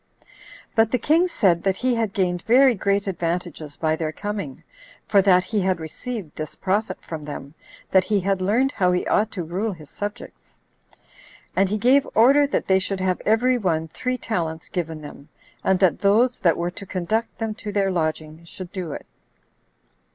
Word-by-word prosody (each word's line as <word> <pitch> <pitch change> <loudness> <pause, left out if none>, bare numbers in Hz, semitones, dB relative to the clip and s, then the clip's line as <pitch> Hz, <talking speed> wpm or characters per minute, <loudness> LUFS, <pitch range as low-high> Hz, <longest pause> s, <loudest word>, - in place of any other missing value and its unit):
But 225 -1 +4
the 250 - +1
king 320 +9 +3
said 185 - +2
that 190 0 +1
he 255 0 +1
had 225 -3 0
gained 180 -3 0
very 255 +5 +5
great 200 -1 0
advantages 170 -5 -3
by 155 -1 +1
their 160 -1 -2
coming, 200 -6 -5 0.4
for 200 -2 +5
that 185 -2 +4
he 205 +2 -1
had 185 -1 +1
received 185 +3 -6
this 155 0 -6
profit 195 0 -1
from 160 -2 -6
them, 145 -1 -8 0.4
that 190 -1 +4
he 210 0 +1
had 195 0 0
learned 235 +8 +2
how 180 -7 +2
he 180 - 0
ought 215 +1 +2
to 180 - -3
rule 190 +6 -2
his 155 -4 -14
subjects. 205 0 -8 1.0
And 190 0 +3
he 210 - 0
gave 260 +6 +4
order 275 +6 +6
that - - -1
they 190 0 +4
should 190 0 -3
have 185 -1 0
every 245 +4 +3
one 160 -5 0
three 255 +9 -2
talents 165 -9 -3
given 165 -4 -4
them, 145 0 -11 0.3
and 190 - +3
that 185 -4 +3
those 230 +5 +3
that 170 -3 +3
were 175 +1 -2
to 200 - -10
conduct 205 +6 -2
them 225 -1 -2
to 210 - -4
their 200 -1 +1
lodging 155 -1 -2
should 175 +1 -9
do 180 -6 -5
it. - - -8
190 Hz, 185 wpm, -23 LUFS, 170-220 Hz, 1.0 s, order